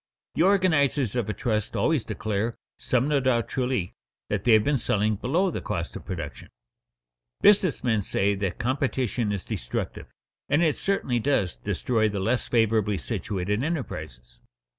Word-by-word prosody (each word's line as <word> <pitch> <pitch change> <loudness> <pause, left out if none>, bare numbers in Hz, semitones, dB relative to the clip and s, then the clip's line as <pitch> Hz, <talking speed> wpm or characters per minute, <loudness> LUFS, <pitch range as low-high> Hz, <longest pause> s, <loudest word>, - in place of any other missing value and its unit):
The - - 0
organizers 160 - +3
of 120 -4 -1
a - - 0
trust 110 -4 -1
always 155 -7 +2
declare, 110 +2 -2 0.2
some 125 +2 +1
no 150 -2 +2
doubt 125 -3 +1
truly, 125 -8 -1 0.4
that 105 -2 -1
they 120 - +6
have 110 -1 +6
been 145 +2 +1
selling 105 -1 +1
below 165 - +1
the - - -4
cost 85 -1 -4
of - - -8
production. - - -6 0.9
Business 195 -6 +4
men 110 -4 +2
say 100 +1 +1
that 95 -3 -2
competition 125 -3 -1
is 100 -2 -3
destructive, - - -4 0.4
and 145 +4 +3
it 155 -3 +1
certainly 135 -11 0
does 110 - +1
destroy 110 - 0
the 100 -1 -3
less 115 +6 0
favorably 110 -3 +2
situated 105 +1 -2
enterprises. 80 - -5
115 Hz, 155 wpm, -26 LUFS, 100-135 Hz, 0.9 s, they